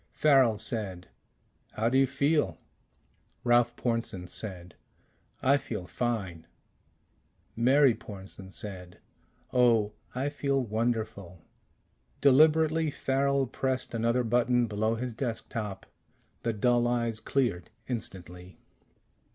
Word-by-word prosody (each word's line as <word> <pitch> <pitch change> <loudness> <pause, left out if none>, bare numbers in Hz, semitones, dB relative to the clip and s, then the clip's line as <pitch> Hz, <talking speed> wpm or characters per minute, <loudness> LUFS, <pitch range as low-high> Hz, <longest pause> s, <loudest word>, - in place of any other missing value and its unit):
Farrel 135 -7 +4
said, 100 -5 -4 0.6
"How 110 +1 0
do 125 - +1
you 135 0 +5
feel?" 140 - +1 0.9
Ralph 120 -1 +3
Pornsen 115 -6 -2
said, 90 -3 -6 0.7
"I 140 +2 +5
feel 105 -9 -5
fine." 95 -8 -3 1.1
Mary 130 +3 +5
Pornsen 95 -2 -10
said, 90 -2 -7 0.6
"Oh, 115 -4 +3 0.2
I 130 +2 -1
feel 140 -2 -1
wonderful!" 110 -6 -3 0.8
Deliberately 155 +3 +4
Farrel 140 0 +1
pressed 130 +1 -2
another 115 +2 +1
button 120 +1 +2
below 110 +1 0
his 125 +1 -4
desk 115 -1 -4
top. 105 -4 -5 0.6
The 115 - 0
dull 120 +2 +2
eyes 115 -2 0
cleared 110 -7 -1 0.2
instantly. 90 -7 -5
115 Hz, 100 wpm, -29 LUFS, 100-130 Hz, 1.1 s, you